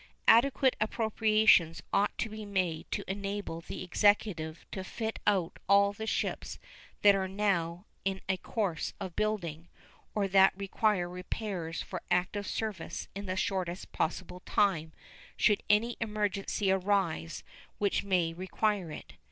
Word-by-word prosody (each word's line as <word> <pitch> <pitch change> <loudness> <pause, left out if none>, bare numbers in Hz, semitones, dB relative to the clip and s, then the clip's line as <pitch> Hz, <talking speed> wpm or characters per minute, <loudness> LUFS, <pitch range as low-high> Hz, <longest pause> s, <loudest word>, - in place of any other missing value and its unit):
Adequate 260 +2 +5
appropriations 215 -6 +3
ought 205 +1 +2
to - - -1
be 215 0 -7
made 185 -6 -2
to - - -2
enable 200 -3 -4
the 170 - -6
Executive 180 -4 +1
to 190 - -4
fit 220 +3 -4
out 190 -5 +1
all 200 0 +5
the 220 +2 -6
ships - - -2 0.5
that 205 -1 +8
are 190 -1 0
now 185 -3 -1 0.2
in 195 0 -1
a 190 0 +1
course 185 -4 -2
of 180 -3 -6
building 175 -6 -2 0.5
or 205 -2 +1
that 190 0 +5
require 200 -1 +1
repairs 180 -1 -4
for - - -6
active 185 +3 0
service 215 -6 -4
in 200 +1 -6
the 185 - -1
shortest 190 -3 -2
possible 180 +2 -2
time 180 -5 +1 0.5
should 210 - +3
any 225 +3 +3
emergency 205 -2 0
arise 190 - 0 0.3
which 200 -1 +1
may 180 -4 +1
require 190 +1 -1
it. - - -9
195 Hz, 135 wpm, -31 LUFS, 180-210 Hz, 0.5 s, that